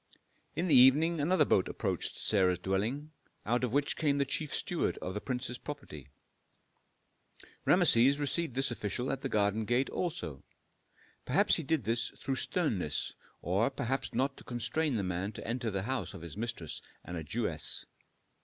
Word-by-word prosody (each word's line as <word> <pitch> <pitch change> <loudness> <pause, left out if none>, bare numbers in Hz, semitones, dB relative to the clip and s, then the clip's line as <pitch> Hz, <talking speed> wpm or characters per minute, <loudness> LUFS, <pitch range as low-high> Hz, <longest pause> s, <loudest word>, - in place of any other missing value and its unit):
In 175 - 0
the 160 - +3
evening 145 +6 +6
another 180 +6 +4
boat 95 - +3
approached - - -2
Sarah's 95 -4 +2
dwelling, 105 - -2 0.3
out 120 +3 +1
of 125 - 0
which 145 +2 +1
came 145 -3 +1
the 140 - +2
chief 150 +2 -2
steward - - -1
of 95 - -5
the 105 - -4
prince's 125 -1 -3
property. 105 - -8 1.6
Rameses 130 +5 +5
received 145 -1 -1
this 135 0 +1
official 120 +2 -2
at 135 -1 -2
the 135 - -2
garden 105 0 +2
gate 120 +5 +1
also. 80 - -3 0.8
Perhaps - - +4
he - - -1
did 155 -2 +1
this 115 +2 0
through 135 0 -2
sternness, 110 - -1 0.3
or 95 +8 +2
perhaps 135 0 -2
not 135 +1 0
to - - -12
constrain 120 +5 -1
the 105 - 0
man 90 +3 -2
to - - -7
enter 120 0 -1
the 95 -2 -2
house 115 -6 -2
of 90 - -9
his 85 -2 -8
mistress 110 -8 -4 0.2
and 90 - -6
a 80 - -4
Jewess. 75 - -1
120 Hz, 165 wpm, -32 LUFS, 100-140 Hz, 1.6 s, evening